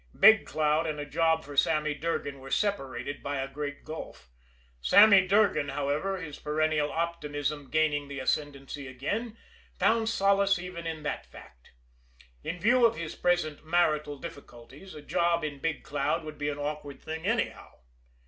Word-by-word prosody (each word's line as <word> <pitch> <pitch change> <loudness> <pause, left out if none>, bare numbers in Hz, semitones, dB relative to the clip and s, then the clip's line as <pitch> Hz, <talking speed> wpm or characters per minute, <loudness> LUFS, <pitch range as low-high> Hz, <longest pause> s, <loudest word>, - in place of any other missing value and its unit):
Big 220 -1 +7
Cloud 155 +3 +1
and 150 -1 -3
a 145 - -4
job 160 +2 +1
for 145 0 -9
Sammy 150 +1 +2
Durgan 145 -2 -3
were 135 +1 -10
separated 145 -7 -2
by 140 0 -3
a 135 0 -2
great 145 +1 -6
gulf. 155 - -8 0.5
Sammy 200 - +7
Durgan, 195 -7 +3
however, 145 +7 -1
his 150 -5 -8
perennial 150 0 0
optimism 150 -4 -3
gaining 150 -2 +1
the 140 -1 -6
ascendancy 140 0 -3
again, 205 - -4 0.4
found 225 -1 +2
solace 200 -2 +3
even 175 -1 -6
in 160 -2 -5
that 150 - -4
fact. - - -16 0.7
In 180 - -4
view 240 +6 +4
of 230 -1 +4
his 165 -2 -5
present 175 -5 0
marital 155 -3 +1
difficulties 140 +2 -11
a 150 - -10
job 170 +2 +1
in 145 -2 -4
Big 160 +2 -2
Cloud 150 +3 -1
would 155 -1 -9
be 145 0 -1
an 145 - -4
awkward 145 -1 -5
thing 160 +3 -5
anyhow. 230 +2 -1
155 Hz, 160 wpm, -29 LUFS, 145-175 Hz, 0.7 s, Big